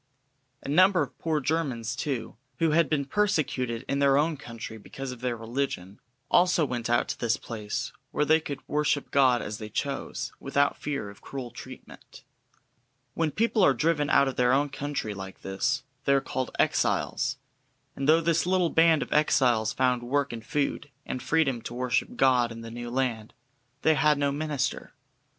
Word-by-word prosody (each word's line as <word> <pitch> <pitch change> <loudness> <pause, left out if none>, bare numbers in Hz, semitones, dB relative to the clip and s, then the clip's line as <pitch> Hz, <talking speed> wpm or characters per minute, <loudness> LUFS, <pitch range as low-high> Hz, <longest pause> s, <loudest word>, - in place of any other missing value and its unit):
A - - -8
number 180 +3 +5
of 135 - -9
poor 160 -2 0
Germans, 130 -6 -1
too, 130 -3 -3 0.2
who 165 -2 +2
had 165 +1 +3
been 145 -3 0
persecuted 135 - 0
in 140 - 0
their 140 -1 +4
own 155 +2 +2
country 115 -5 -8
because 135 +5 -7
of 125 -1 -9
their 125 -2 -1
religion, 115 -5 -4 0.3
also 175 -3 +4
went 120 -3 -3
out 120 - +2
to - - -4
this 120 -1 +1
place 105 -3 -5 0.2
where 150 - 0
they 155 +2 +5
could 145 -3 -7
worship 150 -1 0
God 130 -3 +4
as 105 +1 -5
they 110 -1 -7
chose, 135 +2 -3
without 140 +1 +1
fear 140 -9 -3
of 100 - -17
cruel 130 -3 -7
treatment. - - -12 0.9
When 165 -1 0
people 220 +4 +1
are 140 -6 +5
driven 150 -2 +1
out 140 - +5
of 135 - -4
their 125 0 +3
own 145 +2 +2
country 140 -5 -3
like 95 -1 -9
this, 120 +9 -1 0.2
they 140 - +4
are - - +4
called 130 -1 -3
"exiles," - - +1 0.6
and 135 +2 -1
though 160 +1 +6
this 165 +1 +1
little 180 -2 +2
band 165 -1 +4
of - - -5
exiles 125 -7 +3
found 125 -1 +1
work 140 +2 -1
and 115 -1 -7
food, 145 +3 -2 0.2
and 130 - -4
freedom 140 -7 +1
to 120 - -7
worship 125 -1 -1
God 125 -3 +3
in 115 0 -8
the 115 0 -8
new 120 +1 -6
land, 120 -4 -2 0.5
they 160 - +5
had 150 0 +3
no 140 0 +1
minister. 145 -2 -3
135 Hz, 180 wpm, -27 LUFS, 120-150 Hz, 0.9 s, though